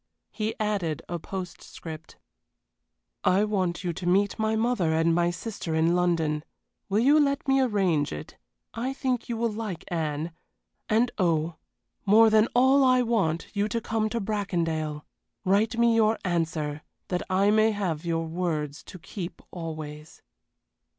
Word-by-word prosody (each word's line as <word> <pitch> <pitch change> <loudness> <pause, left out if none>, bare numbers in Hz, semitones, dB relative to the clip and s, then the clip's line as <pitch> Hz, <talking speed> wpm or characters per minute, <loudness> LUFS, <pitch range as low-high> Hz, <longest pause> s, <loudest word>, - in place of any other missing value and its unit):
He 215 0 -2
added 200 -8 -1
a 175 0 -3
postscript: 165 -3 -8 1.1
"I 185 +3 +4
want 190 -4 -1
you 175 -2 -1
to 175 +2 -5
meet 200 +4 +2
my 220 0 +1
mother 220 -8 +1
and 165 +1 +3
my 175 +1 +2
sister 175 -2 -4
in 165 +2 +3
London. 165 -4 +1 0.5
Will 205 +3 +2
you 285 +5 +5
let 280 -1 +1
me 270 0 +4
arrange 190 - +1
it? 75 +1 -7 0.4
I 245 +4 -2
think 255 -3 -2
you 235 - -2
will 230 0 0
like 210 -6 -5
Anne. 160 -1 -2 0.6
And 230 +3 +3
oh, 165 -2 +1 0.5
more 220 +2 +6
than 215 +1 +5
all 265 +3 +5
I 255 -1 +4
want 195 -9 0
you 205 +1 +1
to 230 +2 -1
come 220 -1 -1
to 235 - -2
Bracondale. 165 -8 -2 0.4
Write 215 +5 +2
me 235 -1 +4
your 220 0 +3
answer 160 -4 -1 0.3
that 180 -1 -1
I 195 +2 +3
may 215 +1 +4
have 185 -7 -2
your 165 -1 -1
words 160 -3 -2
to - - -10
keep 175 0 -7
always." 155 -3 -7
185 Hz, 150 wpm, -27 LUFS, 165-220 Hz, 1.1 s, more